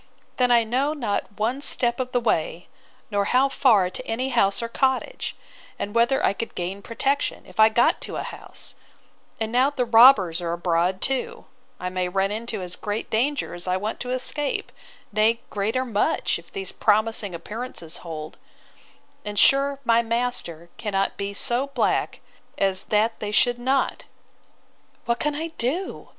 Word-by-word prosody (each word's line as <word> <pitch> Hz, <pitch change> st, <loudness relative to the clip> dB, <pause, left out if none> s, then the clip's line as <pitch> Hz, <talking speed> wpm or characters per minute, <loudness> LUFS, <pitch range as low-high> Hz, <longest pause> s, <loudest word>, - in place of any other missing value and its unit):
—Then 250 Hz, -1 st, +3 dB
I 235 Hz, -1 st, +5 dB
know 260 Hz, +6 st, 0 dB
not 230 Hz, -8 st, -1 dB
one 235 Hz, +6 st, -1 dB
step 240 Hz, -4 st, +3 dB
of 255 Hz, 0 st, -2 dB
the 245 Hz, -, +2 dB
way, 175 Hz, -6 st, -1 dB, 0.5 s
nor 200 Hz, -1 st, +1 dB
how 260 Hz, +5 st, +3 dB
far 225 Hz, -9 st, +4 dB
to -, -, -6 dB
any 250 Hz, +4 st, -1 dB
house 230 Hz, -3 st, +2 dB
or -, -, -2 dB
cottage; 265 Hz, -, -1 dB, 0.4 s
and 205 Hz, -, -4 dB
whether 235 Hz, +3 st, +3 dB
I -, -, +3 dB
could 230 Hz, -, -6 dB
gain 185 Hz, +3 st, -4 dB
protection, 275 Hz, +6 st, -1 dB
if -, -, -15 dB
I 220 Hz, 0 st, +8 dB
got 235 Hz, +2 st, +2 dB
to -, -, -6 dB
a -, -, -3 dB
house: -, -, -8 dB, 0.7 s
And 220 Hz, 0 st, -2 dB
now 255 Hz, +3 st, +4 dB
the 265 Hz, -4 st, -1 dB
robbers 225 Hz, -8 st, +6 dB
are 170 Hz, -1 st, -2 dB
abroad 175 Hz, +2 st, 0 dB
too, 460 Hz, -, -2 dB, 0.3 s
I 180 Hz, 0 st, -4 dB
may 180 Hz, -1 st, -1 dB
run 195 Hz, +2 st, 0 dB
into 220 Hz, -2 st, -4 dB
as 180 Hz, 0 st, -6 dB
great 210 Hz, +1 st, -4 dB
danger 275 Hz, +7 st, 0 dB
as 175 Hz, +1 st, -4 dB
I 185 Hz, 0 st, +1 dB
want 210 Hz, +3 st, -4 dB
to 250 Hz, -, -5 dB
escape; 265 Hz, +3 st, -2 dB, 0.4 s
nay, 215 Hz, +2 st, +3 dB
greater 220 Hz, +6 st, -1 dB
much, 215 Hz, -7 st, 0 dB
if 170 Hz, -, -18 dB
these 195 Hz, -1 st, -5 dB
promising 215 Hz, -3 st, +1 dB
appearances 210 Hz, -3 st, -6 dB
hold: 155 Hz, -2 st, -8 dB, 0.8 s
And 205 Hz, 0 st, -5 dB
sure 275 Hz, +4 st, +4 dB
my 230 Hz, 0 st, +4 dB
master 230 Hz, -8 st, -3 dB
cannot 195 Hz, -2 st, -1 dB
be 200 Hz, 0 st, -4 dB
so 245 Hz, +6 st, -1 dB
black 275 Hz, -3 st, 0 dB, 0.4 s
as 195 Hz, -1 st, +1 dB
that 220 Hz, +2 st, +1 dB
they 210 Hz, -, -3 dB
should 245 Hz, +3 st, +3 dB
not!—What 240 Hz, -2 st, -4 dB
can 295 Hz, -1 st, -1 dB
I 320 Hz, +2 st, -3 dB
do? 305 Hz, +11 st, -2 dB
225 Hz, 165 wpm, -24 LUFS, 195-255 Hz, 0.8 s, I